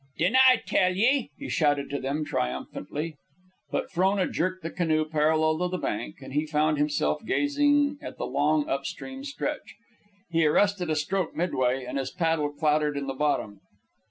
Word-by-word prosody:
"Dinna 195 +11 +3
I 255 - +7
tell 185 -1 +2
ye!" 245 - +2
he - - -7
shouted 145 +2 +1
to 140 - -2
them, 140 +3 -2
triumphantly. 145 - -4 0.5
But - - -3
Frona 190 +1 +2
jerked 185 +1 -2
the 165 - -4
canoe 155 -3 +1
parallel 155 +1 +2
with 180 0 0
the 185 - -2
bank, 155 -4 -4
and 130 - -9
he 150 +2 0
found 155 0 +1
himself 150 +8 0
gazing 290 +2 +2
at - - -8
the - - -3
long 145 +3 +1
up 135 0 -1
stream 265 0 -7
stretch. 290 +1 -4 0.6
He 165 -1 +3
arrested 185 +2 +2
a 155 - +1
stroke 170 +3 -1
midway, 130 -7 0
and 130 +3 -3
his 135 - -3
paddle 160 -3 0
clattered 150 0 +1
in 140 - -3
the 135 - -3
bottom. 130 -8 -1
155 Hz, 175 wpm, -27 LUFS, 145-185 Hz, 0.6 s, I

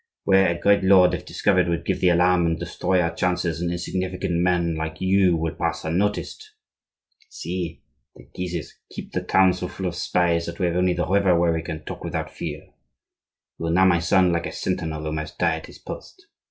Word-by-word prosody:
Where 95 -1 +4
a 85 0 -1
great 100 +2 +3
lord, 95 -1 +6
if - - -4
discovered, 95 -3 +2
would 85 - -2
give - - -1
the 90 - +4
alarm 90 0 +3
and 80 -1 0
destroy 90 +2 -1
our 85 -1 0
chances, 90 -1 -1
an 85 - -1
insignificant 90 +1 -3
man 90 -2 +1
like 80 0 -5
you 95 -2 +3
will 80 0 -2
pass - - -3
unnoticed. 105 - -2 0.7
See! 90 - -5 0.3
The - - -15
Guises 90 -4 -5
keep - - -8
the - - -2
town 95 -1 +4
so 90 0 -4
full 95 - -6
of 90 - -1
spies 85 -1 0
that 85 - -6
we 95 - 0
have 85 -1 0
only 90 0 +2
the 90 0 -1
river 95 -2 +3
where 85 -1 +2
we 80 - -2
can 80 -1 -6
talk - - -7
without - - -4
fear. - - -7 0.9
You 85 - -3
are - - 0
now, 95 +3 +4
my 90 -2 +4
son, 90 +2 +3
like 85 0 -1
a - - -6
sentinel 80 -4 -3
who 75 0 -3
must 75 0 -5
die 85 -2 +1
at 80 - -10
his - - -13
post. - - -10
90 Hz, 210 wpm, -23 LUFS, 85-95 Hz, 0.9 s, lord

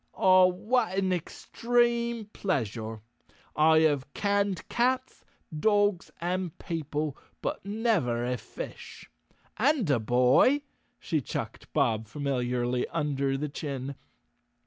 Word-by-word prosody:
"Ah, 185 -1 +6
what 210 +2 0
an 190 -1 +1
extreme 235 +5 0
pleasure. 115 - -2 0.5
I 160 +1 +5
have 145 -3 +1
canned 200 -2 0
cats, 255 +2 0 0.3
dogs 205 +1 +2
and 180 -1 -2
people, 150 -3 -3 0.2
but - - -3
never 200 - 0
a 125 0 -1
fish. - - -9 0.5
And 265 - +2
a 130 - +3
boy," 125 - +4 0.4
she 155 -3 -1
chucked - - -6
Bob 110 -1 +1
familiarly 125 -2 -1
under 140 -4 -1
the 150 +2 -2
chin. 140 -2 -5
160 Hz, 105 wpm, -28 LUFS, 135-205 Hz, 0.5 s, Ah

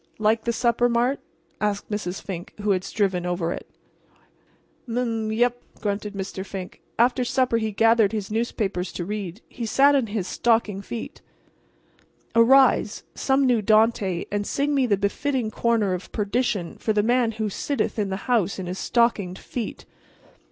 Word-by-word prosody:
"Like 220 +1 +1
the 235 - +2
supper, 240 +1 +2
Mart?" 240 +4 +1 0.4
asked 210 0 -2
Mrs. 195 -3 -3
Fink, 180 -2 -7
who 205 0 +1
had 185 -1 +1
striven 195 -3 0
over 175 -1 -1
it. - - -9 1.2
"M 235 0 -3
m 250 0 +1 0.2
m - - -2
yep," 245 +2 +1 0.2
grunted 205 -1 -3
Mr. 190 -1 -4
Fink. 190 -1 -8 0.2
After 250 +2 +3
supper 255 -1 +1
he 220 -1 -1
gathered 225 0 +4
his 210 -2 -4
newspapers 210 -5 -1
to 175 - -4
read. 205 0 -5
He 235 -2 -5
sat 280 +5 +5
in 265 -5 +2
his 205 -3 -3
stocking 225 -4 +1
feet. 230 +3 -7 1.1
Arise, 235 -1 +4
some 270 0 +2
new 245 -4 +3
Dante, 215 -4 +2
and 205 0 -1
sing 285 +1 0
me 270 -3 +2
the 205 -3 +2
befitting 230 +4 -1
corner 220 -4 +1
of 180 +1 -6
perdition 210 -4 -1
for 220 - 0
the 210 -1 +2
man 240 0 +2
who 215 0 -2
sitteth 225 +3 -2
in 205 -2 0
the 190 0 -5
house 220 -7 +1
in 190 - -4
his 180 +2 -5
stockinged 215 -6 +1
feet. 235 -4 -6
220 Hz, 165 wpm, -24 LUFS, 195-240 Hz, 1.2 s, sat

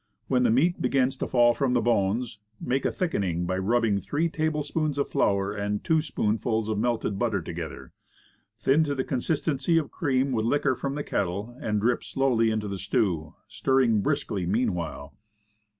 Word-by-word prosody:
When 125 -2 +2
the 125 - +3
meat 150 +10 +2
begins 130 0 +2
to - - -3
fall 120 -1 +4
from 135 -1 0
the 125 - +3
bones, 110 0 0 0.2
make 130 +2 -1
a - - +2
thickening 95 - -1
by 95 +1 -1
rubbing 110 0 +2
three 155 +10 -1
tablespoonfuls 155 -1 -1
of 140 - 0
flour 100 0 +1
and 105 0 -2
two 160 -1 +2
spoonfuls 110 -5 -1
of 110 -1 -1
melted 110 -4 -1
butter 110 -5 +1
together; 85 -1 -7 0.7
thin 135 +8 +3
to 145 -1 -2
the 130 - -1
consistence 140 +2 -2
of 165 -4 +2
cream 135 -4 0
with 110 -3 0
liquor 140 +1 +2
from 140 +2 -4
the 145 - -3
kettle, 100 +4 -2
and 105 -6 -1
drip 120 +2 +1
slowly 125 -4 +1
into 110 -1 -1
the 100 -1 -4
stew, 80 -9 -1
stirring 115 0 +2
briskly 95 -1 -1
mean 110 +2 +1
while. 80 -4 -5
120 Hz, 175 wpm, -26 LUFS, 100-135 Hz, 0.7 s, fall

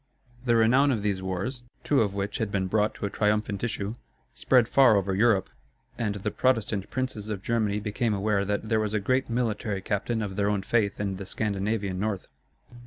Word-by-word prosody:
The 120 -2 +3
renown 125 +5 +4
of 115 -7 0
these 100 -3 0
wars, 95 +8 -3 0.2
two 140 -4 +3
of 100 -3 0
which 100 +1 -3
had 110 -2 -1
been 95 -2 0
brought 105 +3 +1
to - - -4
a - - -1
triumphant 105 -1 0
issue, 105 -3 -2 0.4
spread 125 -4 +3
far 130 -4 +6
over 95 0 0
Europe; 100 -1 +2 0.4
and 105 -3 -2
the 100 - -3
Protestant 110 -6 0
princes 130 -5 -3
of 100 -3 -4
Germany 110 -3 0
became 105 +1 -1
aware 100 0 +1
that 105 +2 -2
there 110 0 +2
was 110 0 -1
a - - +2
great 130 +6 0
military 115 -4 -1
captain 110 +3 -1
of 95 -2 -5
their 100 0 +2
own 100 -2 0
faith 105 -1 +1
in 100 -2 -2
the 100 - -6
Scandinavian 100 -2 -2
North. 100 -2 -2
105 Hz, 195 wpm, -27 LUFS, 100-115 Hz, 0.4 s, far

